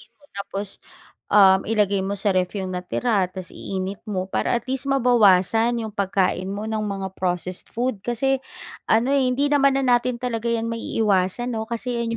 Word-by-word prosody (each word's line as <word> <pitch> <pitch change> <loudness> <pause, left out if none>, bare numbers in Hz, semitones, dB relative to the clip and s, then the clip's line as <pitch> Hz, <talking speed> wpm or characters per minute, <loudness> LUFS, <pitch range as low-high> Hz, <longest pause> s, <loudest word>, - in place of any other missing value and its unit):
Sabihin - - -17
mo 290 - -26
tapos, 200 0 -5 0.5
um, 190 -2 +6
ilagay 205 -3 +2
mo 195 +1 -2
sa 200 0 +1
ref 185 +2 -1
yung 190 -1 -3
natira, 185 +2 0
tas 185 -1 -8
iinit 190 +1 -5
mo 185 -3 -2
para - - +1
at - - -4
least 265 +1 -3
mabawasan 235 -3 +4
yung 215 - -6
pagkain 190 -2 0
mo 200 +2 -4
ng 220 -1 -2
mga 195 -2 -4
processed 180 0 -2
food 240 -3 -2
kasi, 260 +4 0 0.5
ano, 240 +5 +3
eh, 265 -2 +3
hindi 280 +3 +1
naman 275 -1 +4
na 270 - 0
natin 250 0 -3
talaga 235 -2 -2
yan 230 -1 0
maiiwasan, 220 +1 0
'no, 220 0 -4
kasi 235 +1 -2
yan 230 0 -2
215 Hz, 185 wpm, -23 LUFS, 190-240 Hz, 0.5 s, um